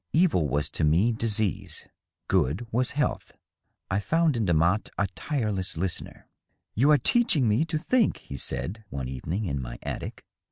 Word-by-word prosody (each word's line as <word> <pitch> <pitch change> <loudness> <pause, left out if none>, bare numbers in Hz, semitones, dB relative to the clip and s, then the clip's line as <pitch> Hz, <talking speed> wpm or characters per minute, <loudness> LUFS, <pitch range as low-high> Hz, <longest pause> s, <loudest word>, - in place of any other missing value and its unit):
Evil 155 - +3
was 75 +1 0
to - - -2
me 85 +10 +4
disease, 105 -6 -1 0.4
good 80 - +1
was 125 +2 +1
health. 150 - -1 0.6
I 95 - +2
found 165 +6 +2
in 110 -4 0
Demotte 85 +5 +2
a 100 - +2
tireless 105 - -2
listener. 90 0 -4 0.2
" - - -47
You 135 +7 +3
are 150 - +7
teaching 160 - +3
me 110 +9 +2
to 165 -1 -2
think,^^ 225 +8 +2
he 70 - -8
said, 100 - -2
one 65 -5 -4
evening, 80 - -3
in 70 -6 -2
my - - -6
attic. - - -6
105 Hz, 165 wpm, -27 LUFS, 80-140 Hz, 0.6 s, are